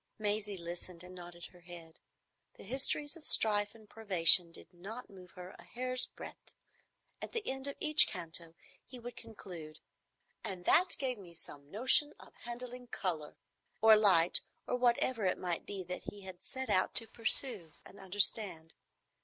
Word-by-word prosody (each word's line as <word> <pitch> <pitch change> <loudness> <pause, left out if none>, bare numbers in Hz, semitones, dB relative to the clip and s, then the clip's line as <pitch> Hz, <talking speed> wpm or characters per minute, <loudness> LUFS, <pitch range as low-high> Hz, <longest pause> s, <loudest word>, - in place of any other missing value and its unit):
Maisie 210 -1 -4
listened 175 0 -9
and 180 0 -14
nodded 175 -1 -12
her 180 - -20
head. 170 -2 -13 0.6
The - - -15
histories 275 - -2
of 330 - -16
strife 205 -5 +3
and 220 -2 -19
privation 180 -5 +3
did 180 - -15
not 205 +8 -11
move 185 -2 -16
her 180 +1 -12
a - - -15
hair's 255 +1 -1
breadth. - - -14 0.7
At - - -9
the 460 -3 -6
end 265 +1 -5
of 280 - -6
each 305 -1 +7
canto 165 -2 -6 0.3
he 255 - -14
would 240 0 -11
conclude, 180 -9 -12 0.6
"And 180 -2 -8
that 365 +2 +4
gave 255 -5 -5
me 175 -3 -15
some 145 -3 -11
notion 260 - +2
of - - -18
handling 245 +1 -9
colour," 165 -9 -6 0.4
or 220 0 +5
light, 185 -6 +4 0.2
or - - -4
whatever 245 -1 -1
it 185 - -1
might 175 -2 -6
be 195 -2 -8
that 180 +1 -9
he 205 - -15
had 185 -2 -13
set 260 0 -7
out 185 - -1
to 230 - 0
pursue 220 - +5
and 200 - -17
understand. 190 -4 -1
200 Hz, 165 wpm, -31 LUFS, 175-240 Hz, 0.7 s, each